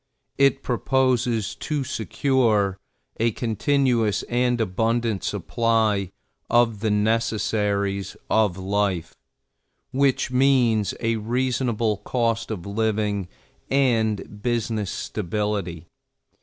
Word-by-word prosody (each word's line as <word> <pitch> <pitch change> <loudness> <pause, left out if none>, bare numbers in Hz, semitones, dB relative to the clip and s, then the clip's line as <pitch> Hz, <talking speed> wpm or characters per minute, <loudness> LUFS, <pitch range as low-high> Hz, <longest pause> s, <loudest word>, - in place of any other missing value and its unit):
It 140 0 +3
proposes 120 -4 +1
to 150 -3 -3
secure 110 - +1 0.4
a 115 +1 +3
continuous 115 -2 +1
and 125 0 0
abundant 115 0 0
supply 110 -5 0 0.4
of 115 -3 +3
the 110 +1 0
necessaries 105 -2 0
of 105 -5 +2
life, 95 -3 -1 0.8
which 135 -1 +1
means 125 -5 +3
a 115 -1 +1
reasonable 120 -1 0
cost 115 0 -1
of 100 -6 -5
living 105 -2 -1 0.4
and 110 -6 +1
business 115 -4 -1
stability. 95 -3 -3
110 Hz, 90 wpm, -24 LUFS, 105-120 Hz, 0.8 s, It